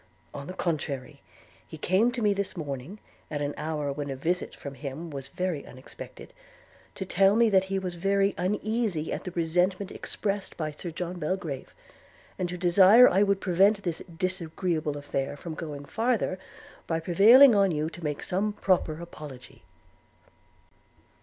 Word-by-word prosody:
On 140 0 -7
the 185 - -6
contrary, 145 -5 -3 0.5
he 160 - -9
came 190 +10 +2
to 240 -2 -3
me 205 -1 +4
this 200 -1 -3
morning, 145 +4 -5 0.3
at 150 - -3
an 145 0 -2
hour 150 -2 -2
when 145 0 -5
a 135 - -3
visit 175 +7 -2
from 140 - -8
him 145 +4 -7
was 140 -1 -6
very 175 0 -3
unexpected, 130 +1 -11 0.6
to 190 - -4
tell 195 +2 +4
me 230 -1 +4
that 190 -1 +4
he 195 0 -2
was 185 -2 -3
very 195 +2 +1
uneasy 210 -3 -1
at - - -5
the - - -3
resentment 180 +3 0
expressed 200 -1 -4
by 155 -2 -2
Sir 160 +4 -7
John 175 +2 -5
Belgrave; 155 -4 -3 0.7
and 180 -1 -1
to 180 - -5
desire 190 +7 +7
I 190 - +3
would 200 -1 +3
prevent 195 +3 +3
this 170 -3 -2 0.2
disagreeable 165 -4 -2
affair 145 0 -3
from 165 +2 -7
going 150 -3 -6
farther, 225 - 0 0.5
by 165 -1 0
prevailing 225 +11 +7
on 200 -2 +4
you 155 -2 -1
to 175 - -11
make 150 -2 -3
some 205 +3 -1
proper 180 -6 +1
apology.' 145 -7 -11
175 Hz, 160 wpm, -27 LUFS, 150-195 Hz, 0.7 s, desire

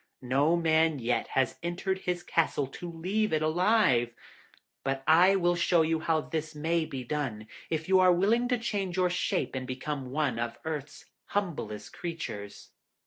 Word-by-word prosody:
No 140 +6 +2
man 160 -2 +3
yet 120 -1 -1
has 130 -1 +1
entered 180 +3 -2
his 180 -1 -3
castle 160 -3 +1
to 170 +6 -8
leave 195 +6 -1
it 155 -1 +1
alive, 155 - +3 0.7
but 135 0 -2
I 180 +5 +6
will 175 -2 +2
show 170 -1 +3
you 160 0 0
how 160 0 +1
this 155 0 -4
may 160 +2 0
be 135 -4 -6
done, 125 -6 -3 0.2
if 160 -1 -2
you 190 0 +5
are 185 -1 +6
willing 215 +7 +2
to 250 0 +1
change 200 -6 -3
your 180 -1 +2
shape 180 - -1
and 130 -1 -4
become 135 +1 -4
one 135 -4 -1
of 120 0 -3
Earth's 150 -2 -5 0.2
humblest 155 - -3
creatures.' 105 -12 -6
160 Hz, 165 wpm, -29 LUFS, 135-180 Hz, 0.7 s, I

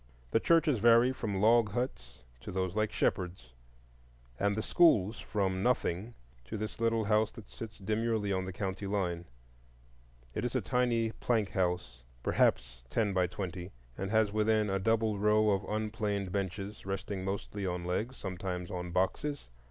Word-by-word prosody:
The - - +4
churches 155 -4 +3
vary 120 +3 +6
from 105 -6 -3
log 110 0 +4
huts 65 - -4 0.2
to - - -8
those 95 0 -2
like 110 0 +1
Shepherd's, 90 -9 -1 0.9
and 100 0 +2
the 110 - -2
schools 110 - +4
from 95 -3 -1
nothing 115 -2 0 0.3
to 65 - -5
this 110 +2 -5
little 115 -1 +2
house 105 +1 +3
that 110 - -11
sits 110 -1 -8
demurely 110 0 0
on 95 0 -1
the 95 - -4
county 95 +1 -3
line. 90 -4 -1 1.1
It - - -2
is 125 - -2
a - - +4
tiny 120 -3 +1
plank 110 -4 0
house, 90 -9 -1 0.2
perhaps 60 +1 +1
ten 105 - +1
by 90 -1 +2
twenty, 90 0 -5 0.3
and 95 - -3
has 110 -1 +3
within 110 -1 +2
a 95 - +1
double 110 0 +1
row 105 +1 +4
of 95 -1 +1
rough - - -6
unplaned 105 -3 -1
benches, 100 +2 -3
resting 95 0 -4
mostly 100 +1 -3
on 90 -1 -3
legs, 110 +9 -2
sometimes 90 -1 -4
on 90 -1 -4
boxes. 95 - -1
100 Hz, 160 wpm, -32 LUFS, 95-110 Hz, 1.1 s, vary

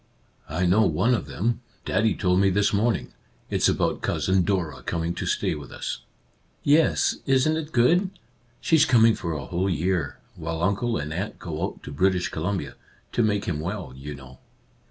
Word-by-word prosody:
" - - -38
I 85 +4 0
know 95 +5 +4
one 95 +11 +2
of 120 - -1
them; 115 +4 -1 0.2
Daddy 110 0 +2
told 90 -2 +2
me 100 0 +4
this 100 +2 +2
morning. 105 - 0 0.4
It's - - +3
about - - 0
Cousin 95 0 +1
Dora 85 -8 -1
coming 85 +5 -2
to 85 - -4
stay - - 0
with 70 -4 -8
us." - - -4 0.6
"Yes 150 +3 +3
— - - -34
isn't 135 +4 +3
it 160 -1 -4
good? 170 +10 +3 0.5
She's 160 -3 +4
coming 115 -2 +5
for 85 -5 -3
a 70 -4 -4
whole 90 +9 -1
year, 85 -4 -1 0.2
while 80 0 -4
uncle 100 +5 +1
and 75 +1 -4
aunt 95 +5 -4
go 80 -4 -5
out - - -8
to - - -7
British 90 +4 +1
Columbia, 90 -2 -3 0.2
— - - -35
to - - +2
make 105 -2 +1
him 75 -4 -2
well, 90 -4 -4
you 70 +2 -7
know." 65 -2 -13
95 Hz, 190 wpm, -25 LUFS, 80-110 Hz, 0.6 s, coming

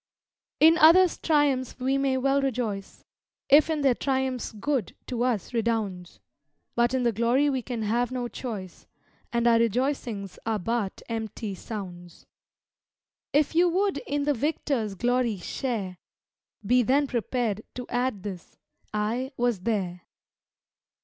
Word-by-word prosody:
_" 310 - +9
In 330 +1 +5
others' 350 +3 +6
triumphs 285 -5 +1
we 260 +2 +1
may 275 -1 +1
well 275 +2 +2
rejoice, 230 -7 -3 0.4
If 295 +3 +6
in 310 -2 0
their 270 -2 +5
triumphs 260 -1 -1
good 230 - -2
to 245 -2 -3
us 245 -4 -1
redounds; 215 -6 -2 0.5
But 240 +2 +2
in 255 - +1
the 235 - +3
glory 240 +6 +2
we 260 -2 -1
can 235 -2 -4
have 240 +4 0
no 250 -1 -2
choice, 210 -6 -7 0.4
And 235 0 0
our 230 -1 +5
rejoicings 230 -4 -1
are 225 -1 0
but 210 0 -2
empty 220 -2 -4
sounds. 180 -4 -8 1.1
If 295 +2 +2
you 345 +2 +4
would 380 -2 +1
in 285 0 0
the 290 0 +2
victor's 265 -6 -1
glory 245 0 +1
share, 190 -2 -4 0.7
Be 250 +4 +4
then 270 +5 +3
prepared 235 -4 -1
to 250 - -5
add 245 -5 -1
this, 190 -4 -8 0.4
"_I 235 +6 -1
was 240 -4 +1
there! 185 -4 -2
240 Hz, 140 wpm, -26 LUFS, 215-270 Hz, 1.1 s, _"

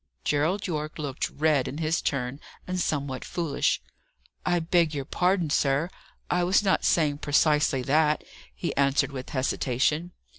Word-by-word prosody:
Gerald 165 +8 +1
Yorke 155 -3 -3
looked 145 -3 -3
red 150 -3 +1
in 140 - -5
his 160 +1 0
turn, 135 0 -2 0.3
and 185 0 -3
somewhat 140 -6 -2
foolish. 165 -5 -1 0.6
"I 175 0 +2
beg 165 -1 +2
your 140 -2 -3
pardon, 180 0 +1
sir; 145 +5 +1 0.4
I 180 0 +1
was 185 +4 +3
not 190 -2 +2
saying 150 -3 +2
precisely 150 -2 +2
that," 150 +2 +2 0.3
he - - -3
answered 140 +1 +2
with 130 -2 -7
hesitation. 140 +5 0
150 Hz, 145 wpm, -27 LUFS, 140-170 Hz, 0.6 s, was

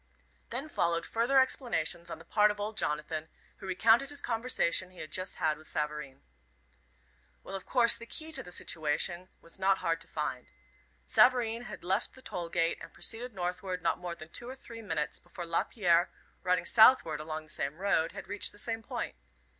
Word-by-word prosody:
Then 260 +6 -4
followed 170 - +1
further 240 +4 +3
explanations 175 - +1
on - - -5
the - - -14
part 210 0 +4
of 210 0 -3
old 210 +1 -3
Jonathan, 155 -1 -2 0.3
who 195 - -9
recounted 225 +8 +4
the 290 - -8
conversation 230 -8 +1
he 185 - -19
had 155 -2 -7
just 185 +2 -2
had 155 -3 0
with 155 - -14
Savareen. 150 - -4 1.2
Well, 195 - -6
of 190 - -7
course, 235 -2 +6
the 235 - -9
key 315 +5 -3
to - - -4
the 180 - -11
situation 170 +3 -2
was 170 +2 -7
not 195 0 +4
hard 165 -2 -1
to - - -10
find. 140 -5 -3 0.6
Savareen 240 - +4
had - - -8
left 190 +5 -1
the 260 - -14
toll 170 -1 -5
gate 165 0 +1
and - - -9
proceeded 235 0 -4
northward 180 0 -3
not - - +1
more 175 -1 -5
than 160 -1 -11
two 240 +8 -7
or 260 - -6
three 230 -3 -10
minutes 160 -8 -2
before 175 - -8
Lapierre, 175 0 +2 0.3
riding 180 -1 +1
southward 220 -7 +6
along 155 0 -5
the 155 - -11
same 140 +3 -2
road, 180 -4 +1
had 195 - -8
reached 205 +1 +1
the - - -16
same 225 +1 -3
point. 220 - -4
185 Hz, 190 wpm, -31 LUFS, 165-230 Hz, 1.2 s, course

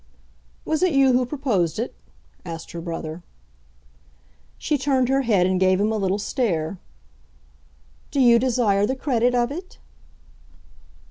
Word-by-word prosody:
"Was 315 +1 -1
it 365 -3 +2
you 270 -2 +4
who 250 0 +2
proposed 230 - -1
it?" 235 +3 -3 0.5
asked 165 -2 -8
her 170 - -6
brother. 165 -1 -6 1.4
She 305 - -1
turned 265 -2 +1
her 270 +1 +2
head 210 -8 +2
and 185 0 +1
gave 185 0 +3
him 210 +2 +1
a 220 - -1
little 195 -1 0
stare. 200 - -2 1.3
"Do 280 - -2
you 240 -2 +6
desire 225 -5 +1
the 260 - -1
credit 245 -2 +1
of 240 +1 +1
it?" 360 +5 -8
235 Hz, 140 wpm, -23 LUFS, 185-265 Hz, 1.4 s, you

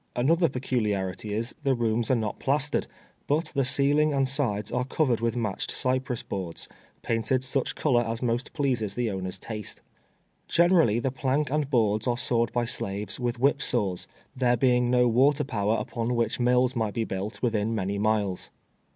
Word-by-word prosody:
An 125 +6 +2
other 170 0 +3
peculiarity 105 -6 -2
is, 115 +3 -2
the 135 -2 +1
rooms 115 -1 0
are 130 - +4
not 110 -3 -3
plastered, 145 +2 +1 0.4
but 155 +4 0
the 140 -1 +1
ceiling 145 +3 +3
and 135 -1 +2
sides 115 -7 -1
are 125 - 0
covered 130 -2 0
with 115 0 0
matched 105 -5 -2
cy 130 -1 +1
press 130 -3 -4
boards, 90 -4 -5 0.4
painted 115 +3 0
such 130 0 -1
color 125 -6 +2
as 115 -1 -3
most 120 +1 -1
pleases 125 -9 -1
the 120 -3 -1
owner's 95 0 -4
taste. 105 +1 -7 0.6
Generally 170 - +4
the 135 - -1
plank 135 +2 -1
and 150 -2 0
boards 110 -4 +1
are 120 -1 +1
sawed 120 -2 0
by 120 0 0
slaves 100 -1 -2
with 120 -1 -2
whip 140 +3 +2
saws, 100 -7 0 0.3
there 125 -1 +2
being 125 0 +3
no 125 0 +4
water 135 +5 +3
power 110 -4 0
upon 120 0 -2
which 115 0 0
mills 125 +1 +2
might 110 -3 -1
be 115 - 0
built 100 +3 -5
within 115 -1 0
many 100 -1 -2
miles. 105 -3 0
120 Hz, 175 wpm, -27 LUFS, 110-130 Hz, 0.6 s, are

